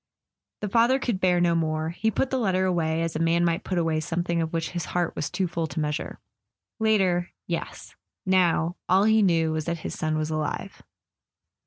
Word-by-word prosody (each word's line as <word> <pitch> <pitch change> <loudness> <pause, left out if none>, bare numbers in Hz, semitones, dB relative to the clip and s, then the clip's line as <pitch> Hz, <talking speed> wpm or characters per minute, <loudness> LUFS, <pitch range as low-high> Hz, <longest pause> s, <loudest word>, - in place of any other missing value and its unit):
The 210 - -1
father 235 +5 +4
could 240 -7 -2
bear 180 -1 +3
no 175 -1 +3
more; 160 -1 0
he 220 +6 0
put 255 +5 -1
the 265 - +1
letter 190 -4 +1
away, 165 -3 0
as 165 - -3
a - - -1
man 165 +1 +2
might 170 +3 0
put 185 - -2
away 165 -2 +1
something 170 +2 -1
of 160 -1 -2
which 165 -1 -2
his 175 -2 -3
heart 175 -2 -1
was 145 - -2
too 190 - -1
full 165 -1 -2
to 145 +2 -5
measure 150 -1 -3 0.6
it. - - -3
Later—yes; 180 -5 -1 0.3
now, 175 -2 +2
all 190 +2 +5
he 220 +1 +4
knew 165 -5 +3
was 155 -1 -2
that 170 -1 -3
his - - -3
son 155 0 -1
was 155 0 -2
alive. 155 -1 -3
170 Hz, 200 wpm, -26 LUFS, 160-185 Hz, 0.6 s, all